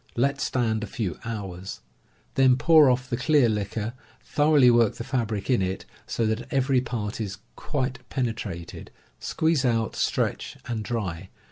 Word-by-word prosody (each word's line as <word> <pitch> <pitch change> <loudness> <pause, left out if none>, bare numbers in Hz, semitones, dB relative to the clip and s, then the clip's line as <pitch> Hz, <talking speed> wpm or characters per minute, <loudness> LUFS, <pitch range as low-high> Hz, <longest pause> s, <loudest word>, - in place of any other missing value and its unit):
Let 140 +3 +1
stand 110 -3 0
a - - -4
few 95 -5 -4
hours. 95 -4 -6 0.5
Then 130 -1 +5
pour 155 +1 +6
off 125 0 +1
the 120 - -2
clear 135 0 +4
liquor, 105 +1 -2 0.3
thoroughly 145 -4 +4
work 120 -2 +3
the - - -5
fabric 115 -6 -2
in 125 -6 +3
it, 95 0 -2 0.2
so 115 - -1
that 110 +3 -2
every 135 -1 +2
part 115 -3 -4
is 100 -2 -4 0.2
Suite 135 -2 -2
penetrated, 110 -9 -4 0.3
squeeze 160 -4 +1
out, 115 -4 +1
stretch - - -1
and 115 -2 -3
dry. 95 -6 -4
120 Hz, 150 wpm, -26 LUFS, 105-130 Hz, 0.5 s, pour